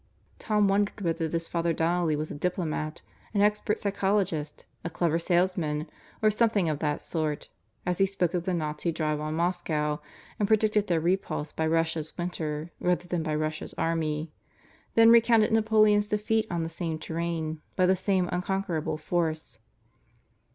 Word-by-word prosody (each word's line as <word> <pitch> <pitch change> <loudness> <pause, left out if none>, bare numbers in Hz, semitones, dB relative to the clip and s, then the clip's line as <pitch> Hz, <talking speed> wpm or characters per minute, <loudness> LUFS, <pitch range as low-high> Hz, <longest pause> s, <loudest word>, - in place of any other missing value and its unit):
Tom 210 -2 +2
wondered 200 +2 +1
whether 165 -2 0
this 165 +1 -3
Father 170 -1 0
Donnelly 165 -1 +1
was 155 +1 -3
a - - -4
diplomat, 155 -1 -2 0.3
an 200 - +3
expert 210 0 +2
psychologist, 195 -6 -1 0.2
a 170 - -3
clever 165 -1 0
salesman, 170 -3 0 0.4
or 215 - +5
something 215 -4 +2
of 150 -2 -1
that 150 -2 -1
sort 155 -3 -3 0.4
as 180 -1 -1
he 195 - +5
spoke 185 -3 -1
of 175 -1 -1
the 185 - 0
Nazi 155 +1 -2
drive 155 -2 -1
on 155 +1 -3
Moscow 160 -3 0 0.4
and 205 - +2
predicted 215 -1 +3
their 170 -2 +2
repulse 170 -3 -1
by 160 - -1
Russia's 160 -1 0
winter 165 -2 -3
rather 180 0 0
than 175 -1 -1
by 155 -1 -1
Russia's 155 +1 -3
army, 160 -1 -1 0.6
then 225 0 +7
recounted 230 -2 +5
Napoleon's 215 -2 +4
defeat 215 +1 0
on 170 -2 -1
the - - -2
same 165 -1 -3
terrain 160 -1 -3
by 185 - +3
the 190 +1 +4
same 185 -1 +1
unconquerable 180 -4 -1
force. 155 -6 -2
170 Hz, 160 wpm, -28 LUFS, 155-195 Hz, 0.6 s, then